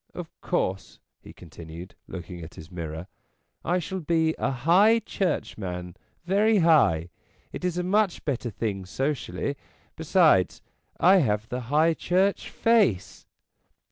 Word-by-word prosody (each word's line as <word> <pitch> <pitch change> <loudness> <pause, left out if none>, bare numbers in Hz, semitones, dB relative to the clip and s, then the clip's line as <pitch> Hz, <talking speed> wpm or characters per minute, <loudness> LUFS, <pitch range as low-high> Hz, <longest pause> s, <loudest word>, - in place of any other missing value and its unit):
Of - - -7
course," 95 +1 -2 0.2
he - - -13
continued, 85 +1 -11
looking 90 -1 -8
at 80 +1 -10
his 80 +3 -12
mirror, 80 -1 -6 0.3
" - - -47
I - - +3
shall 190 +2 -4
be 160 -1 +1
a - - 0
high 175 - +4
churchman, 90 - -3 0.3
very 210 +4 +3
high. 140 - +3 0.4
It - - -7
is 180 -1 -1
a 180 - -1
much 200 0 +1
better 130 -4 -2
thing 100 -3 -4
socially; 140 +3 -3 0.4
besides, 160 - +3 0.4
I 185 +3 +6
have 110 - 0
the 125 +1 -3
High 155 +3 +3
Church 185 +4 0
face." 220 - +1
145 Hz, 135 wpm, -26 LUFS, -, 0.4 s, I